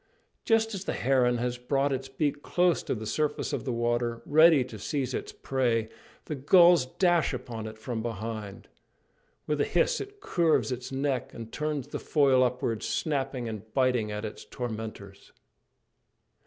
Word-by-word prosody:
Just 225 0 +2
as 195 -1 -5
the - - -1
heron 125 -2 +2
has 125 +1 -2
brought 135 +2 0
its 135 0 -4
beak 145 +1 -1
close 175 +1 +2
to - - -2
the 110 -1 -6
surface 150 +6 -1
of - - -3
the 130 - -1
water, 120 0 -1
ready 155 -2 +6
to 120 -4 -10
seize 135 +4 -2
its - - -4
prey, 120 -4 0 0.4
the - - -4
gulls 170 +1 +5
dash 175 -4 +3
upon 115 -3 -6
it 110 0 -9
from 115 0 -4
behind. 110 -2 -5 0.8
With 150 -1 0
a - - +4
hiss - - +1
it 410 +1 -9
curves 165 - +1
its 125 +1 -5
neck 135 -1 -2
and 115 -1 -8
turns 150 -3 -3
the - - -4
foil 135 -4 +3
upwards, 125 -3 -1
snapping 135 -5 -2
and 110 -1 -7
biting 125 -5 +2
at 105 +1 -4
its 105 - -7
tormentors. 110 -4 -7
130 Hz, 165 wpm, -28 LUFS, 115-150 Hz, 0.8 s, ready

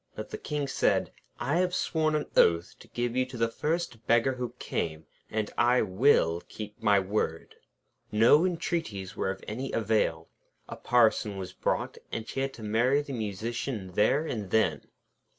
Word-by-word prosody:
But - - -7
the - - -5
King 150 -1 -2
said: 135 - +1 0.3
'I 145 +6 0
have 180 0 +1
sworn 155 -3 +1
an 150 - 0
oath 85 0 +4
to - - -15
give 120 0 -2
you 130 - +3
to 130 -1 -8
the 115 0 +2
first 150 -1 -3
beggar 120 +3 +4
who 125 -2 -5
came; 80 -1 -3 0.2
and 110 -1 -2
I 120 +1 +4
will 95 -5 +3
keep 105 -1 -8
my 105 -2 +4
word.' 95 -4 -2 0.6
No 115 +9 +6
entreaties 165 - -2
were - - -1
of 95 0 -5
any 130 +5 -4
avail. 105 -7 +1 0.4
A - - -7
Parson 110 -4 +2
was 95 -1 -6
brought, - - -2
and 115 - -4
she - - -4
had 135 0 -2
to 110 - -10
marry 120 +7 +2
the 140 - -7
Musician 110 -1 -4
there 120 - +3
and 105 -10 -4
then. 90 -7 +1
115 Hz, 170 wpm, -28 LUFS, 100-135 Hz, 0.6 s, No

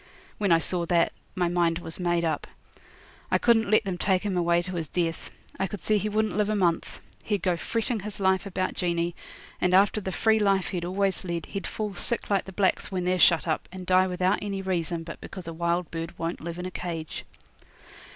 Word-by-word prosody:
When 200 -3 +2
I 165 - +7
saw 170 +1 -1
that, 170 -1 +3 0.2
my 180 -2 +1
mind 170 -1 +2
was 165 -1 -6
made 175 -1 +1
up. 155 -3 -1 0.8
I - - +4
couldn't 225 -3 +3
let 215 +1 +5
them 190 -3 -3
take 190 -2 +2
him 200 -3 -1
away 175 0 +2
to 180 - -5
his 165 -3 -3
death. 165 0 -2 0.3
I 195 - +1
could 205 0 -7
see 215 -1 +2
he 210 - -1
wouldn't 215 +1 0
live 210 0 +1
a 215 - +1
month. 175 -4 0 0.2
He'd 205 -4 -1
go 180 -2 +2
fretting 230 +5 -2
his 205 +1 -6
life 190 0 +2
about 185 -1 -1
Jeanie, 170 -1 -1 0.5
and 180 0 +3
after 200 +2 +4
the 190 - -3
free 220 +3 +3
life 195 -3 +2
he'd 175 -3 -3
always 195 +2 0
led 170 -2 -3
he'd 195 - -5
fall 210 -2 -3
sick 220 +4 0
like 195 -2 +2
the 190 - -8
blacks 190 +1 +1
when 180 -2 -2
they're 180 0 +1
shut 170 -1 +5
up, 155 - -1
and 185 0 -8
die 185 +1 +4
without 185 +2 +1
any 195 -2 -3
reason 170 -3 -1
but 165 - -9
because 185 -3 -8
a 165 - -4
wild 170 +1 -1
bird 165 0 -5
won't 165 +1 -3
live 170 +1 -5
in 180 - -5
a 185 - -4
cage. 165 -3 -5
185 Hz, 220 wpm, -27 LUFS, 170-200 Hz, 0.8 s, I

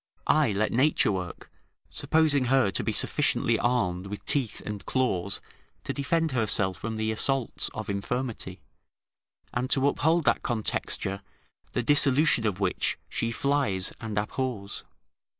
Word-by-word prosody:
I 155 -4 +3
let 105 +1 0
nature 130 -2 +3
work, 90 -3 -6 0.4
supposing 155 -4 +2
her 130 -5 +3
to - - 0
be - - 0
sufficiently - - +2
armed 100 -7 0
with 105 +1 -7
teeth 135 -7 +1
and 105 -3 -5
claws 100 -7 -1 0.4
to - - -3
defend 160 +3 0
herself 105 -6 +2
from 110 0 -5
the 110 0 -1
assaults 130 +3 +1
of 110 - -5
infirmity, 100 -2 -4 0.9
and 125 +1 -1
to 135 0 +3
uphold 160 +4 +2
that - - +3
contexture, 105 -4 -1 0.5
the 125 - 0
dissolution 145 -2 +4
of 100 -2 -2
which 95 -3 0
she 115 - -1
flies 125 -8 0
and 110 -2 -5
abhors. 105 -1 -3
115 Hz, 135 wpm, -27 LUFS, 100-135 Hz, 0.9 s, dissolution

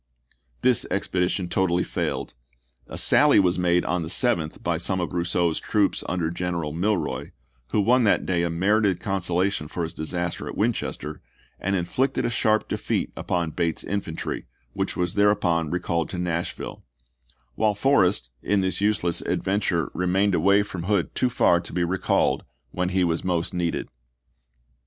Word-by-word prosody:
This 125 -2 +3
expedition 90 -1 0
totally 90 -1 +1
failed. - - -3 0.5
A - - -7
sally - - +5
was 90 -1 +2
made 90 0 +2
on 90 +1 0
the 80 - -5
7th 85 -7 0
by 85 -1 0
some 95 +2 0
of 90 - -3
Rousseau's 85 -1 +1
troops 105 -2 +1
under 85 -2 -1
General 85 -3 -2
Milroy, 100 +4 -1 0.3
who 105 - 0
won 125 +5 +4
that 105 - +3
day 90 -2 +1
a 85 - 0
merited 95 +2 +2
consolation 95 -3 -1
for 85 +3 -4
his 80 - -4
disaster 85 +2 -3
at - - -6
Winchester, 75 0 -2 0.4
and 95 +1 0
inflicted 125 +10 0
a 120 - 0
sharp 110 -2 +2
defeat - - -2
upon 85 -2 -1
Bate's 85 -1 -1
infantry, 95 -5 -4 0.3
which - - -2
was 90 +1 0
thereupon 90 -6 +2
recalled 85 -2 -1
to 90 - -4
Nashville; 85 -1 -3 0.7
while 105 - +1
Forrest, 95 - +3
in 100 -1 +1
this 95 +1 0
useless 100 -5 +1
adventure, 95 -4 0
remained 95 +2 +1
away 100 +4 +4
from 95 -4 -6
Hood 100 -3 0
too 125 - +1
far 85 -7 +3
to 85 - -9
be 90 0 0
recalled 90 +2 +1 0.3
when 90 0 -1
he 95 0 +1
was 85 -1 0
most 90 -1 0
needed. 85 -2 -1
90 Hz, 155 wpm, -25 LUFS, 85-100 Hz, 0.7 s, sally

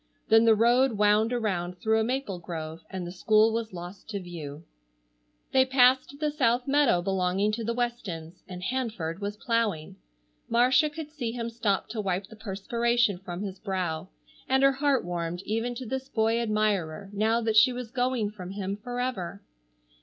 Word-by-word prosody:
Then 225 +1 +6
the 225 -1 +6
road 240 +3 +4
wound 210 +2 +3
around 185 -7 -1
through 220 +3 +2
a - - +2
maple 240 -6 -2
grove 160 -2 -6
and 185 -2 -5
the 175 - -6
school 215 +5 +3
was 230 -1 -2
lost 180 +3 -9
to 205 -2 -3
view. 165 -4 -8 0.9
They 260 -1 +5
passed 260 +1 +4
the 300 -1 0
South 250 -4 +1
meadow 275 -11 +3
belonging 190 +2 +1
to 225 +2 -3
the 230 +1 -2
Westons, 195 -9 -4
and 180 -1 -8
Hanford 215 -8 -3
was 205 +1 -3
plowing. 225 -9 -1 0.5
Marcia 255 +6 +4
could 300 0 -8
see 245 -7 -4
him 235 -1 -4
stop 215 -5 0
to 215 -1 -3
wipe 190 -1 -1
the 220 - -14
perspiration 220 0 0
from 180 0 -6
his 195 -2 -6
brow, 185 -4 -3 0.4
and 265 +1 +3
her 275 - +7
heart 275 -3 +1
warmed 175 0 -3
even 225 +3 -1
to 255 - -6
this 265 +3 -4
boy 225 +1 +1
admirer 210 -4 -1
now 220 +3 +2
that 225 -2 0
she 225 +4 +7
was 245 -2 -6
going 250 -4 0
from 185 -4 -8
him 195 0 -4
forever. 245 -5 -4
220 Hz, 175 wpm, -27 LUFS, 185-245 Hz, 0.9 s, her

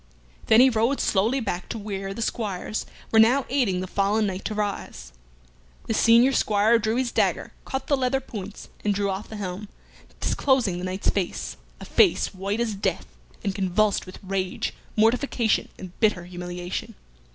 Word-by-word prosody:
Then 225 +1 +7
he 265 - +7
rode 230 +4 +1
slowly 220 +7 +2
back 190 -6 -4
to - - -4
where 195 -2 -4
the 225 +4 -3
squires 215 -2 -3 0.2
were 225 - +5
now 245 +5 +5
aiding 235 -10 +1
the - - -3
fallen 200 +3 +1
knight 190 -1 -3
to 215 - -2
arise. 195 - -4 0.7
The - - -1
senior 235 +4 +5
squire 220 0 +3
drew 220 0 0
his 250 -1 0
dagger, - - 0
cut 265 0 -3
the 285 - +2
leather 265 0 +1
points, 210 -6 -8
and 205 -1 +1
drew 200 0 0
off 190 +2 -5
the 220 - -7
helm, 200 0 -5 0.5
disclosing 245 -10 +1
the 180 - -4
knight's 185 +1 0
face 190 -4 -3 0.2
a - - -9
face 380 - +3
white 195 +3 -3
as 235 -2 0
death, 200 - -2 0.4
and 200 -2 -1
convulsed 195 +2 +1
with 185 - -9
rage, 190 -1 -2 0.2
mortification, 230 +1 +2
and 185 -2 -9
bitter 210 -6 +2
humiliation. 180 0 -6
210 Hz, 170 wpm, -25 LUFS, 190-230 Hz, 0.7 s, Then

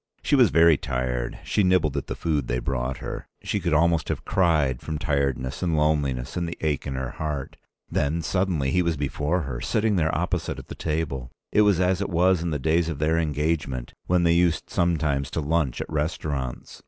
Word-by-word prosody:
She - - +3
was - - +6
very 80 +1 +5
tired. 60 -2 -2
She - - +1
nibbled 90 -6 +3
at 70 - -3
the - - -4
food 75 -6 -1
they - - 0
brought 65 0 -2
her. - - -5 0.2
She 105 - -1
could 85 -2 -1
almost 85 0 +2
have - - -3
cried 75 -9 +2
from 80 -1 -4
tiredness 70 -4 -1
and 85 -4 +1
loneliness 70 -4 0
and 85 -1 -1
the 85 - -6
ache 75 -3 -1
in 70 - -3
her 65 -1 -3
heart. 75 -2 -4 0.3
Then 80 +4 0
suddenly 85 -7 0
he 90 - +3
was 85 -3 0
before 75 +5 -1
her, 65 -5 -5
sitting 110 - +1
there 80 -2 +1
opposite - - -2
at - - -10
the - - -5
table. 75 -6 -3 0.2
It 105 - +4
was 100 -4 +4
as 90 +1 +2
it 100 - -2
was 90 0 +3
in 85 - -1
the 75 - -1
days 80 +4 +1
of 80 - -3
their 80 +3 +2
engagement, 75 -5 -1
when 90 -1 +3
they 85 -1 +4
used 85 -1 +1
sometimes 75 -5 +1
to 80 - -3
lunch 75 -4 0
at - - -4
restaurants. 75 -4 -3
75 Hz, 205 wpm, -25 LUFS, 70-85 Hz, 0.3 s, was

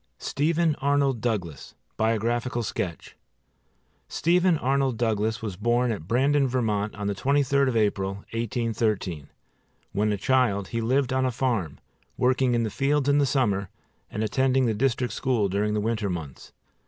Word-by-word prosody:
STEPHEN 160 - +1
ARNOLD 140 -3 +1
DOUGLAS 100 - -3 0.2
BIOGRAPHICAL 115 +2 0
SKETCH 90 -5 -5 0.9
STEPHEN 175 0 +2
ARNOLD 135 -3 0
DOUGLAS 110 -1 0
was 105 -4 -4
born 120 +3 +1
at 90 -7 -5
Brandon, 135 +5 +2
Vermont, 110 -5 -1
on 105 0 -5
the 100 - 0
23d 140 +4 +2
of 125 -3 0
April, 100 -3 +1 0.2
1813. 110 - -2 0.6
When 105 +1 +1
a 105 - 0
child 110 -5 +1
he 115 - -2
lived 130 +3 +1
on 130 0 +2
a - - 0
farm, 115 - -1 0.4
working 125 0 +2
in 115 - +1
the 110 - -2
fields 140 +3 +1
in 145 0 +4
the 140 - +3
summer 100 -8 0 0.4
and 105 - -3
attending 130 +4 +2
the 115 - +1
district 125 0 0
school 120 -5 0
during 105 +2 0
the - - +1
winter 110 -1 -1
months. 80 -7 -7
115 Hz, 155 wpm, -26 LUFS, 105-130 Hz, 0.9 s, in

